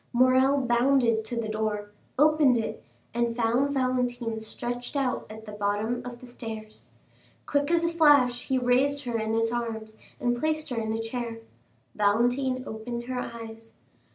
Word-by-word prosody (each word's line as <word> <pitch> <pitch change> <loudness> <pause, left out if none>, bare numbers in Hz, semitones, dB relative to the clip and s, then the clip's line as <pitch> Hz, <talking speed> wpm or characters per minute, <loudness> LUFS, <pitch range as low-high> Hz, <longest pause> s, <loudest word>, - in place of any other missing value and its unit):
Morrel 260 +3 +4
bounded 240 -2 +3
to 235 +1 -3
the 225 - -2
door, 215 -1 -2 0.3
opened 295 -3 +5
it, 225 - -4 0.3
and 235 0 0
found 240 +4 +2
Valentine 245 -3 0
stretched 245 +4 -5
out 265 -3 -1
at 220 +1 -10
the 210 - -8
bottom 210 +3 -1
of 245 -1 -8
the - - -10
stairs. 225 -3 -9 0.6
Quick 285 0 +1
as 340 0 +3
a - - +2
flash, 290 -7 +4
he 265 - +2
raised 260 +3 +2
her 240 -2 -2
in 220 0 -1
his 225 0 +1
arms 220 -2 -4 0.2
and 240 0 0
placed 310 0 -1
her 245 - -2
in 220 0 -2
a 225 - -1
chair. 230 0 -4 0.6
Valentine 245 +5 +2
opened 235 +1 -5
her 250 +1 -3
eyes. 225 -1 -8
240 Hz, 160 wpm, -27 LUFS, 225-255 Hz, 0.6 s, opened